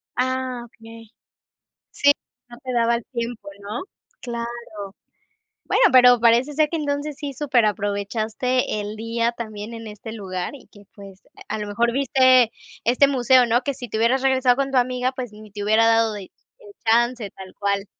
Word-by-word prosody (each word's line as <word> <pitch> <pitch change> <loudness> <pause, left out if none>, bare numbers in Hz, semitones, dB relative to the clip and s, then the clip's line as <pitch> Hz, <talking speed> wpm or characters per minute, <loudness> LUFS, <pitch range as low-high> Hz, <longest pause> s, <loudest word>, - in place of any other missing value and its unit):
Ah, 255 -1 -1
okey. 225 -1 -14 0.8
Sí, 285 0 +4 0.4
no 240 - -12
te 255 -1 -4
daba 235 0 +2
el 235 - -4
tiempo, 235 -4 -5
¿no? 210 +4 -5 0.4
Claro. 235 -4 -6 0.7
Bueno, - - +2
pero 250 -2 +7
parece 240 +5 +3
ser 305 0 +2
que 330 - -2
entonces 290 0 -3
sí 285 -2 -5
superaprovechaste 220 -2 0
el 205 +1 -6
día 230 +1 -1
también 215 -1 -7
en 225 -1 -8
este 215 +1 -9
lugar, 185 +2 -5
y 270 - -15
que, 205 -1 -16
pues, 195 -2 -13 0.3
a 220 - -2
lo 210 - -4
mejor 235 +3 0
viste 255 -2 +4 0.3
este 255 +4 +4
museo, 255 -2 +4
¿no? 240 +2 +2
Que 280 - -1
si 245 -3 -9
te 220 - -3
hubieras 245 +4 +2
regresado 260 -2 +3
con 275 0 -1
tu 260 - +1
amiga, 250 +1 +1
pues, 255 -4 -6
ni 215 -1 -13
te 205 0 -6
hubiera 220 +2 +4
dado 225 -1 +3
de 205 -2 -7
eh, - - -14 0.6
chance 235 -1 +2
tal 190 -1 -12
cual. 200 0 -1
235 Hz, 175 wpm, -22 LUFS, 215-255 Hz, 0.8 s, pero